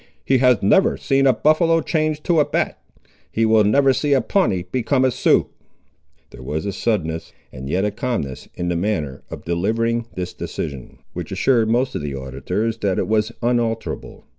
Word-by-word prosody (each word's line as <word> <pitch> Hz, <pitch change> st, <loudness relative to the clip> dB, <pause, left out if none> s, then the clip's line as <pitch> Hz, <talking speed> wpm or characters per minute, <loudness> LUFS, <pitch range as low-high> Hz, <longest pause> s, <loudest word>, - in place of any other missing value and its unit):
"He 130 Hz, -1 st, +3 dB
has 125 Hz, -5 st, +3 dB
never 190 Hz, -, +4 dB
seen 135 Hz, 0 st, +2 dB
a 130 Hz, -, +5 dB
buffaloe 165 Hz, +6 st, +3 dB
change 155 Hz, -2 st, -1 dB
to 170 Hz, -3 st, +2 dB
a 150 Hz, -, +4 dB
bat. -, -, -2 dB, 0.5 s
He 115 Hz, -, +1 dB
will 110 Hz, -1 st, +5 dB
never 135 Hz, +6 st, +4 dB
see 140 Hz, +3 st, +1 dB
a 135 Hz, -, +4 dB
Pawnee 100 Hz, -, +1 dB
become 130 Hz, +5 st, 0 dB
a 130 Hz, -, +3 dB
Sioux!" -, -, +3 dB, 0.9 s
There -, -, -12 dB
was 75 Hz, +6 st, -4 dB
a 100 Hz, -, -2 dB
suddenness, 80 Hz, -9 st, -2 dB, 0.2 s
and 65 Hz, +2 st, -8 dB
yet 95 Hz, +5 st, +1 dB
a 105 Hz, -, 0 dB
calmness 105 Hz, -, -4 dB
in 90 Hz, 0 st, -2 dB
the 85 Hz, -, 0 dB
manner 85 Hz, -7 st, -2 dB
of -, -, -9 dB
delivering 115 Hz, +7 st, 0 dB
this 90 Hz, -1 st, -4 dB
decision, 70 Hz, -4 st, -6 dB, 0.2 s
which -, -, -6 dB
assured 115 Hz, -5 st, +2 dB
most 125 Hz, +3 st, +1 dB
of -, -, -3 dB
the 70 Hz, -2 st, -4 dB
auditors 70 Hz, -, -3 dB
that 100 Hz, -4 st, 0 dB
it 90 Hz, -, 0 dB
was 110 Hz, +1 st, +1 dB
unalterable. 120 Hz, -2 st, -2 dB
110 Hz, 185 wpm, -21 LUFS, 90-130 Hz, 0.9 s, a